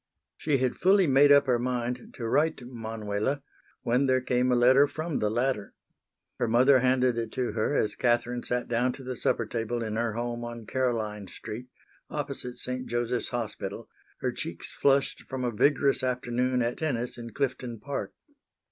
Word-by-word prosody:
She 150 -3 +1
had 130 -1 0
fully 190 +1 +5
made 140 0 +6
up 140 0 +7
her 125 -3 +2
mind 125 0 -3
to 115 - -3
write 155 +7 +2
to 125 - -9
Manuela, 115 +2 -3 0.4
when 125 +4 +2
there 130 0 +3
came 125 0 +1
a - - +4
letter 130 +4 +6
from 155 +1 -3
the 105 - +1
latter. 120 -2 -1 0.6
Her 120 - +1
mother 130 +4 +5
handed 125 -1 +2
it 115 -1 -4
to 125 -2 -1
her 115 +6 0
as 105 - +1
Catherine 120 0 +1
sat 125 0 -2
down 120 +2 +1
to 135 - -10
the 130 0 -4
supper 115 - 0
table 115 +1 -2
in 110 -1 -3
her 115 -1 0
home 120 +1 -3
on 120 -1 -7
Caroline 110 -5 -1
street, 115 +7 -8 0.4
opposite 125 0 -4
St. 125 0 -4
Joseph's 120 +1 -1
Hospital, 115 -4 -4 0.3
her - - 0
cheeks - - -5
flushed 140 0 +2
from 130 -1 -3
a 120 - 0
vigorous 140 +4 +3
afternoon 125 0 0
at 120 +1 -1
tennis 125 -6 -2
in 115 0 -7
Clifton 125 -2 -3
Park. 140 +5 -4
125 Hz, 175 wpm, -28 LUFS, 115-130 Hz, 0.6 s, up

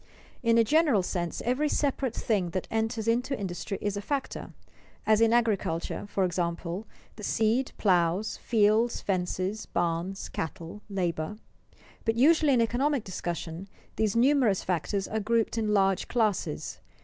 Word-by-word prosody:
_ - - -28 0.4
In 230 -2 +3
a 230 - +6
general 285 - +3
sense 175 -2 -3
every 265 +5 +1
separate 275 -5 0
thing 195 -6 0
that 185 - -4
enters 225 0 -1
into 245 +3 +1
industry 190 0 -4
is 205 -1 -1
a 200 - -3
factor; 275 +6 -3 0.5
as, 215 0 +4
in 225 0 +5
agriculture, 205 -7 0
for 195 -1 0
example, 175 +2 -2 0.3
the 210 - -9
seed, 225 +5 +1
plows, 180 +1 +2
fields, 225 +1 +2
fences, 185 +2 -2
barns, 175 +3 -2
cattle, 170 +4 -6
labor. 180 -1 -2 0.7
But 225 -1 +1
usually 300 +3 +5
in 240 - +4
economic 255 +3 +1
discussion, 175 -1 -5 0.3
these 215 -1 0
numerous 245 -5 +3
factors 190 +2 -1
are 220 - -2
grouped 225 +2 +1
in 220 -2 0
large 195 -2 +2
classes. 200 -10 -1
210 Hz, 145 wpm, -28 LUFS, 185-230 Hz, 0.7 s, a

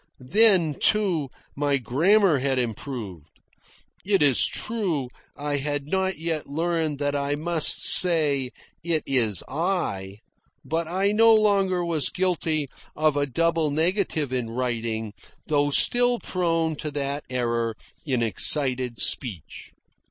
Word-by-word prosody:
Then, 170 - +3
too, 185 -10 +1 0.3
my 145 0 0
grammar 160 - +2
had 135 0 -1
improved. 115 - -6 0.6
It 195 -4 +2
is 140 -4 +4
true, 185 - -2 0.3
I 145 0 -2
had 145 0 -3
not 190 +4 -2
yet 160 -2 -3
learned 160 0 -2
that 145 0 -2
I 140 0 -2
must 160 +1 +2
say 150 -7 +4 0.3
"It 165 -2 0
is 115 -8 +2
I"; 140 - -3 0.5
but 165 0 -2
I 190 +4 0
no 225 +1 +5
longer 195 -4 +1
was 160 -5 0
guilty 165 -5 -1 0.3
of 155 -1 +1
a 145 0 -1
double 165 +3 0
negative 160 -2 -1
in 125 -3 -3
writing, 115 -3 -3 0.3
though 145 -2 0
still 245 - +2
prone 165 -6 -2
to 155 - -4
that 145 0 -4
error 115 -2 -2 0.3
in 130 -6 -1
excited 125 +1 +1
speech. 105 - -1
150 Hz, 125 wpm, -24 LUFS, 130-175 Hz, 0.6 s, no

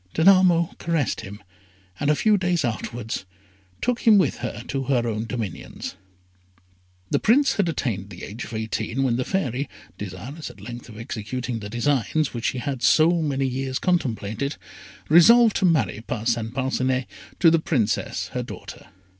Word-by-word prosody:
Danamo 175 -1 +5
caressed 165 -8 0
him, 100 +2 -10 0.6
and 145 - 0
a 150 - +4
few 215 +6 +3
days 175 -5 +1
afterwards 115 0 -4 0.6
took 245 -1 +1
him 220 -3 +6
with 190 - +2
her - - -5
to 135 -2 -2
her 125 -3 +1
own 110 0 -2
dominions. 115 -7 -5 1.2
The - - +3
Prince 275 +6 +4
had 195 -5 +2
attained 105 - -2
the 90 -3 -10
age 110 +4 -6
of - - -9
eighteen, 110 +3 -2
when 120 -3 +1
the 130 - 0
Fairy, 140 -6 -2 0.3
desirous 105 - -7
at - - -14
length 120 0 -8
of 110 - -11
executing 115 +2 -4
the 105 -1 -7
designs 135 +5 0
which 120 -1 -4
she - - 0
had 130 0 -3
so 165 +4 +4
many 140 -3 0
years 130 0 -2
contemplated, 135 - -1 0.5
resolved 225 +8 +7
to - - +2
marry 130 - +2
Parcin 115 0 -2
Parcinet 130 0 0 0.3
to 165 -3 +6
the 165 - +4
Princess, 125 -10 -1
her - - -3
daughter. - - -9
130 Hz, 160 wpm, -24 LUFS, 115-165 Hz, 1.2 s, resolved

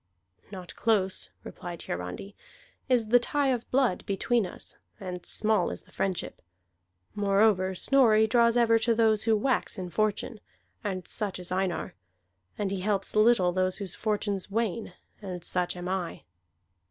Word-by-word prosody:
"Not 185 -3 -9
close," 200 -5 +1
replied 175 -2 -8
Hiarandi, 90 - -5 0.5
"is 235 -4 +2
the 245 +2 +6
tie 280 +3 +1
of 245 -2 -1
blood 255 -8 +2
between 205 +2 +1
us, - - -8 0.2
and 180 -3 -6
small 215 -4 +1
is - - -6
the 185 - -23
friendship. 190 -2 -3 0.7
Moreover, 200 -2 +2
Snorri 220 -1 +4
draws 235 +1 +3
ever 230 -1 +4
to 230 0 +2
those 220 -1 +3
who 225 -1 +4
wax 255 0 0
in 180 -2 -5
fortune, 215 +1 -1 0.4
and 185 -3 -3
such 210 -4 -2
is 180 -1 -8
Einar; 185 -1 -1 0.6
and 200 -2 -1
he 195 - -2
helps 195 +1 -1
little 215 -4 +5
those 185 0 0
whose 195 -4 -4
fortunes 205 -3 -2
wane, 220 -2 -2 0.3
and 180 -4 -6
such 180 0 -1
am 175 0 -5
I." 185 -2 -3
205 Hz, 150 wpm, -28 LUFS, 185-225 Hz, 0.7 s, the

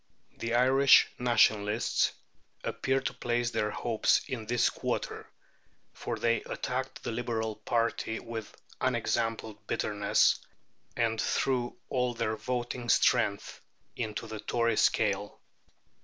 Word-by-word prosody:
The 115 0 -2
Irish 130 +2 +6
Nationalists 110 -3 +2 0.5
appeared 135 0 -1
to - - -1
place 120 0 -1
their 105 - 0
hopes 115 +1 +2
in 115 -4 -5
this 120 0 +3
quarter, - - -4 0.6
for - - -4
they 115 -1 +1
attacked 130 +1 -4
the - - -3
Liberal 110 -2 -2
party 115 0 -1
with 115 -2 -8 0.2
unexampled 110 -2 -1
bitterness, 105 -1 +2 0.6
and 115 -2 +1
threw 125 0 0
all 125 -2 0
their 110 -1 -1
voting 120 0 -3
strength 100 -3 +2 0.3
into 110 -2 -4
the 110 -1 -7
Tory 115 +1 0
scale. 100 -2 +1
115 Hz, 110 wpm, -30 LUFS, 110-120 Hz, 0.6 s, Irish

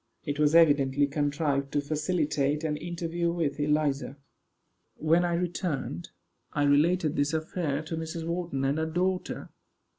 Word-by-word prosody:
It 145 0 -3
was 150 +1 +3
evidently 145 -4 +5
contrived 145 -1 -1
to 145 - +2
facilitate 150 -1 0
an 155 -2 0
interview 170 +1 -2
with 160 -4 -2
Eliza. 145 -2 0 0.8
When 165 +3 +3
I 175 -1 +1
returned, 170 - -3 0.4
I 145 - +1
related 155 +3 +3
this 145 +2 +1
affair 155 -2 -2
to 160 +1 -5
Mrs. 160 +1 -4
Wharton 170 -5 -2
and 140 +3 +1
her 160 - 0
daughter. 180 +3 -2
155 Hz, 140 wpm, -28 LUFS, 145-170 Hz, 0.8 s, evidently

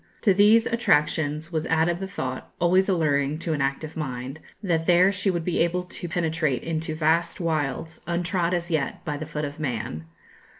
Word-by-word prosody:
To 200 - +4
these 210 +4 +5
attractions 155 -7 +1
was 160 -1 -1
added 165 +2 +2
the 195 - -4
thought, 130 -8 -5
always 185 +3 +3
alluring 150 -5 +1
to 165 0 -2
an 145 - -1
active 140 +3 -2
mind, 135 -1 -5 0.2
that 165 -4 0
there 180 +2 +6
she 195 +1 0
would 170 -3 -1
be 180 - 0
able 175 +2 +1
to 180 -1 -6
penetrate 160 -5 0
into 160 -1 -2
vast 165 +2 +1
wilds, 160 -2 -2
untrod 175 0 0
as 175 0 -3
yet 150 -4 -2
by 150 - -2
the 155 +1 -6
foot 150 -1 -3
of 145 +1 -7
man. 115 - -3
160 Hz, 180 wpm, -25 LUFS, 150-175 Hz, 0.2 s, there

